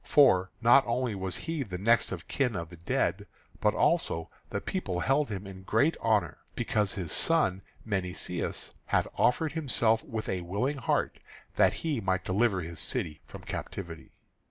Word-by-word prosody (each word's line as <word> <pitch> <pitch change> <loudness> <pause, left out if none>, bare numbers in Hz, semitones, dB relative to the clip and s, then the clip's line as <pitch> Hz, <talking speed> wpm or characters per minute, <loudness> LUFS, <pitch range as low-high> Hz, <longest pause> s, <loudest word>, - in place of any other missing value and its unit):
For 95 -11 +5
not 125 +4 +7
only 120 0 0
was 95 -2 -3
he 165 -2 -3
the 95 -8 -4
next 115 +5 +3
of 90 -3 -6
kin 130 -4 0
to 85 -4 -3
the 85 - -12
dead, 85 +1 -1 0.3
but - - +2
also 80 0 +1 0.2
the - - -2
people 90 -1 -3
held 135 +7 +2
him 100 -2 -5
in 95 -1 -9
great 145 +11 +2
honour 105 -8 +1 0.2
because 105 -2 0
his 90 -5 -3
son 155 - +2 0.2
Menoeceus 90 -4 -2
had - - +2
offered 150 +5 +2
himself 120 -8 +2
with 110 -1 -5
a 90 - -1
willing 105 +12 -1
heart - - 0 0.4
that - - +4
he 145 -8 0
might 95 -1 0
deliver 95 0 +2
his 85 0 -7
city 75 - -2
from - - -10
captivity. 85 -4 -6
100 Hz, 165 wpm, -29 LUFS, 90-125 Hz, 0.4 s, not